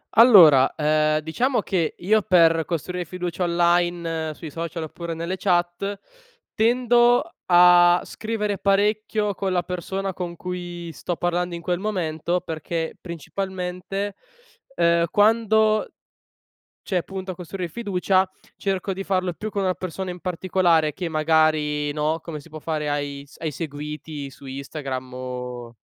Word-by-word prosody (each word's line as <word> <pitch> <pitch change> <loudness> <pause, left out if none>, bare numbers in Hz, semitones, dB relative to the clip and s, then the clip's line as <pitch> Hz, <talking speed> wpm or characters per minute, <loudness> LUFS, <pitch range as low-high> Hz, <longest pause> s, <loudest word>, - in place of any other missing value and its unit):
Allora, 180 - +8
ehm, 155 0 +2
diciamo 240 - 0
che 175 -5 -1
io 215 +4 +3
per 165 -4 +4
costruire 180 +1 -3
fiducia 180 +1 -4
online 170 -2 +1
sui 155 +1 -9
social 165 +1 -4
oppure 165 +2 -6
nelle 170 +3 -3
chat, 180 +2 0 0.6
tendo 240 +5 +3
a 175 0 +6
scrivere 210 -3 -3
parecchio 210 +1 +1
con 190 -1 -2
la 175 -1 +1
persona 190 +2 -3
con 175 -1 -5
cui 175 -1 -6
sto 175 - -4
parlando 175 +1 -1
in 170 - -7
quel 175 0 -1
momento 175 -4 -1
perché 160 0 -4
principalmente, 185 +3 -4 0.6
ehm, 170 0 +3
quando 220 0 +3 0.9
cioè 180 -3 -1
punto 190 -1 -6
a - - -4
costruire 180 +1 -5
fiducia 190 -2 +1 0.3
cerco 195 0 -2
di 190 +1 -4
farlo 185 -2 0
più 210 +6 -6
con 200 -1 -2
una 185 -1 +1
persona 185 +1 -5
in 180 0 -8
particolare 175 -3 +1
che 180 +1 -4
magari, 155 -2 +2
no, 155 +2 -1
come 160 -3 -6
si 150 +3 -15
può 155 - -8
fare 155 -1 -2
ai 145 -1 -3
s 140 - -17
ai 160 - -3
seguiti 150 -1 -6
su 135 - -15
Instagram 135 -1 -5
o 125 -2 -6
175 Hz, 140 wpm, -23 LUFS, 160-190 Hz, 0.9 s, Allora